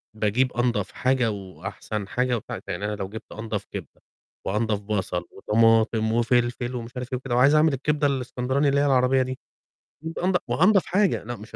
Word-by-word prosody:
باجيب 110 +5 +1
أنضف 120 0 0
حاجة 130 -3 +1
وأحسن 100 +2 -6
حاجة 125 +2 0
ومش 110 - -4
عارف - - -5
يعني 100 +2 -3
أنا 105 0 -2
لو 95 -2 -5
جبت 110 +1 -9
أنضف 110 -2 -4
كبدة 95 -8 -8 0.4
وأنضف 105 +1 0
بصل 95 -4 -2
وطماطم 110 +1 +3
وفلفل 120 +1 +1
ومش 120 -1 -6
عارف 125 +1 -5
إيه - - +1
وكده 125 -1 -3
وعايز 140 +5 +5
أعمل 155 -1 +4
الكبدة 145 +2 +1
الإسكندراني 130 +1 0
اللي 140 0 +2
هي 145 - +3
العربية 130 -1 +3
دي 130 0 -3 0.6
وأجيب 160 +1 -5
أنض 180 +1 +2
وأنضف 195 +3 +4
حاجة 195 0 +1
لأ 120 +2 -5
مش 110 +1 -11
120 Hz, 180 wpm, -25 LUFS, 105-130 Hz, 0.6 s, وعايز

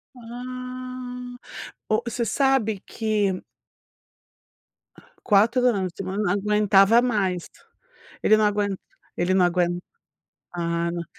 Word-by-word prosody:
Ah, 250 +1 -7 0.5
o 215 - +2
você 235 0 -2
sabe 245 -6 +1
que 210 -4 -1 1.8
4 230 +4 +3
anos 195 -6 +1
de - - -33
semana 195 +2 -3
não 200 - +1
aguentava 210 +1 +4
mais, 195 -8 0 0.8
ele 215 - +5
não 215 - +2
aguen 205 -1 0 0.4
ele 175 +2 +1
não 185 -1 +4
aguen 175 0 0 0.7
a 170 -1 -1
na 170 -1 -4
210 Hz, 105 wpm, -24 LUFS, 190-245 Hz, 1.8 s, ele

